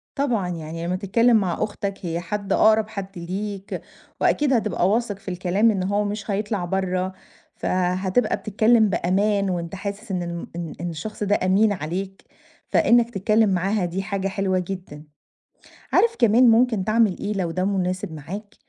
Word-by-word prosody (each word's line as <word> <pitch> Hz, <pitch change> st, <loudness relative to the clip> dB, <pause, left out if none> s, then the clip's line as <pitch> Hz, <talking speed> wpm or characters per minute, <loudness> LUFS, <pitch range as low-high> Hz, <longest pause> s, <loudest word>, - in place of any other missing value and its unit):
طبعًا، 240 Hz, -10 st, 0 dB
يعني 165 Hz, 0 st, -5 dB
لمّا 180 Hz, -, 0 dB
تتكلّم 225 Hz, +5 st, +3 dB
مع 190 Hz, -1 st, 0 dB
أختك 200 Hz, -2 st, -3 dB
هي 170 Hz, 0 st, -2 dB
حد، 200 Hz, +3 st, -3 dB
أقرَب 220 Hz, 0 st, +4 dB
حد 195 Hz, -3 st, -7 dB
ليك 195 Hz, +3 st, -5 dB, 0.4 s
وأكيد 290 Hz, -3 st, +2 dB
هتبقى 210 Hz, -5 st, +1 dB
واثق 215 Hz, -2 st, 0 dB
في 195 Hz, -, -8 dB
الكلام 185 Hz, +5 st, +2 dB
إن 195 Hz, -3 st, -1 dB
هو 205 Hz, +2 st, +1 dB
مش 210 Hz, +1 st, -4 dB
هيطلَع 205 Hz, -2 st, -1 dB
برّه، 185 Hz, 0 st, -1 dB, 0.4 s
فهتبقى 185 Hz, +4 st, 0 dB
بتتكلّم 220 Hz, +1 st, +3 dB
بأمان 200 Hz, +2 st, +1 dB
وأنت 175 Hz, 0 st, -3 dB
حاسس 200 Hz, +2 st, -6 dB
إن 180 Hz, -2 st, -1 dB
الم 170 Hz, 0 st, -5 dB
إن 170 Hz, -2 st, -5 dB
إن 175 Hz, -, -2 dB
الشخص 210 Hz, +7 st, -5 dB
ده 205 Hz, 0 st, +2 dB
أمين 200 Hz, +4 st, +3 dB
عليك، 190 Hz, +4 st, -5 dB, 0.4 s
فإنك 235 Hz, 0 st, +4 dB
تتكلّم 215 Hz, +1 st, +2 dB
معاها 190 Hz, +1 st, +1 dB
دي 175 Hz, +3 st, -3 dB
حاجة 195 Hz, 0 st, -2 dB
حلوة 190 Hz, -1 st, 0 dB
جدًا. 180 Hz, -5 st, -7 dB, 0.9 s
عارف 460 Hz, -1 st, +3 dB
كمان 235 Hz, +1 st, +5 dB
ممكن 225 Hz, -4 st, +3 dB
تعمل 215 Hz, -3 st, +2 dB
إيه 205 Hz, -, -3 dB
لو 180 Hz, -4 st, -1 dB
ده 185 Hz, +2 st, -1 dB
مناسب 185 Hz, -2 st, -1 dB
معاك، 195 Hz, +8 st, -8 dB
195 Hz, 160 wpm, -23 LUFS, 180-215 Hz, 0.9 s, كمان